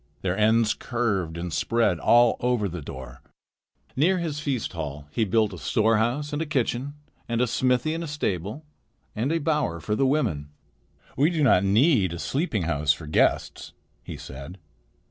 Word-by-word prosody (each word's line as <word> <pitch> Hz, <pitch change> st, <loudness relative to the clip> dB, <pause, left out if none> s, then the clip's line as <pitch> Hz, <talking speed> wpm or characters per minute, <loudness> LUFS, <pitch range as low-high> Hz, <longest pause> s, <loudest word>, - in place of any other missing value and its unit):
Their 90 Hz, -1 st, 0 dB
ends 110 Hz, +1 st, +3 dB
curved 100 Hz, -9 st, -2 dB
and 85 Hz, -1 st, -4 dB
spread 115 Hz, -7 st, +1 dB
all 120 Hz, +8 st, +5 dB
over 120 Hz, -4 st, +1 dB
the 90 Hz, -2 st, -6 dB
door. 65 Hz, -2 st, -9 dB, 0.7 s
Near 175 Hz, +8 st, +3 dB
his 160 Hz, -4 st, -3 dB
feast 135 Hz, -9 st, -2 dB
hall 75 Hz, -3 st, -5 dB
he 110 Hz, -, 0 dB
built 110 Hz, 0 st, +1 dB
a 90 Hz, -, -8 dB
storehouse 115 Hz, -, +1 dB
and 145 Hz, -, -1 dB
a 165 Hz, -, -2 dB
kitchen 135 Hz, 0 st, -1 dB, 0.3 s
and 115 Hz, 0 st, 0 dB
a 125 Hz, -, +3 dB
smithy 125 Hz, +5 st, +1 dB
and 165 Hz, +1 st, -3 dB
a -, -, -5 dB
stable 120 Hz, -, -3 dB, 0.5 s
and 120 Hz, +7 st, -1 dB
a 165 Hz, -, +2 dB
bower 150 Hz, -, 0 dB
for 85 Hz, +7 st, -3 dB
the 135 Hz, +4 st, +2 dB
women. 80 Hz, -, 0 dB, 0.7 s
"We 145 Hz, +5 st, +3 dB
do 165 Hz, -4 st, 0 dB
not 100 Hz, -9 st, +5 dB
need 105 Hz, -, +3 dB
a -, -, -5 dB
sleeping 130 Hz, -, -1 dB
house 75 Hz, -2 st, +2 dB
for 80 Hz, +2 st, -10 dB
guests," 75 Hz, -, 0 dB, 0.3 s
he -, -, -8 dB
said. 70 Hz, +8 st, -9 dB
115 Hz, 170 wpm, -25 LUFS, 90-140 Hz, 0.7 s, all